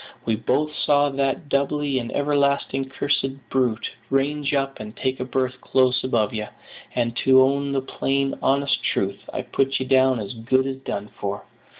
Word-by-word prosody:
"We 115 - +1
both 150 +7 0
saw 145 0 +3
that 135 +2 -1
doubly 140 -1 0
and 120 -1 -5
everlastingly 140 -2 +1
cursed 135 0 -2
brute 125 -4 0 0.2
range 140 +1 +1
up 135 -1 -1
and 105 0 -8
take 130 0 -1
a - - -1
berth 130 0 -2
close 130 -1 +2
above 115 -5 +1
ye; 105 -1 -3 0.5
and, 120 -1 0
to 130 0 +5
own 140 +1 +1
the 135 -1 0
plain, 135 +1 -1
honest 140 +1 +2
truth, 100 0 0
I - - -3
put 135 0 0
ye 130 - -2
down 130 -1 +4
as 100 0 -5
good 125 +3 +1
as 135 -1 -3
done 105 -6 -5
for. 100 0 -3
135 Hz, 175 wpm, -23 LUFS, 125-140 Hz, 0.5 s, to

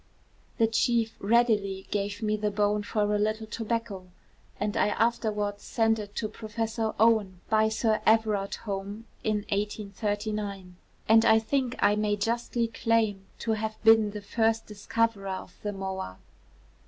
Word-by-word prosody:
The 225 - +4
chief 225 0 +1
readily 205 -3 +2
gave 205 +1 -2
me 215 0 +1
the 210 0 -1
bone 205 0 +1
for 210 -1 0
a 210 - +1
little 215 +1 0
tobacco; 220 -3 -3 0.5
and 205 0 -1
I - - +3
afterwards 210 -2 0
sent 225 -1 +1
it 205 -1 -8
to 215 - -1
Professor 220 +1 -3
Owen 215 -5 +3
by 220 0 +4
Sir 220 0 +1
Everard 215 -3 +2
Home 200 +2 -5 0.2
in 210 -1 0
1839; 205 -1 -3 0.3
and 225 +1 +6
I 220 - +6
think 250 +2 0
I 205 - +3
may 210 0 +1
justly 235 +2 -1
claim 225 -4 0
to 225 - -2
have 220 0 -2
been 225 -1 +6
the 210 0 -6
first 225 +1 +1
discoverer 210 -1 -1
of 185 -1 -6
the 205 - -2
moa.' 190 - -5
215 Hz, 145 wpm, -28 LUFS, 205-225 Hz, 0.5 s, and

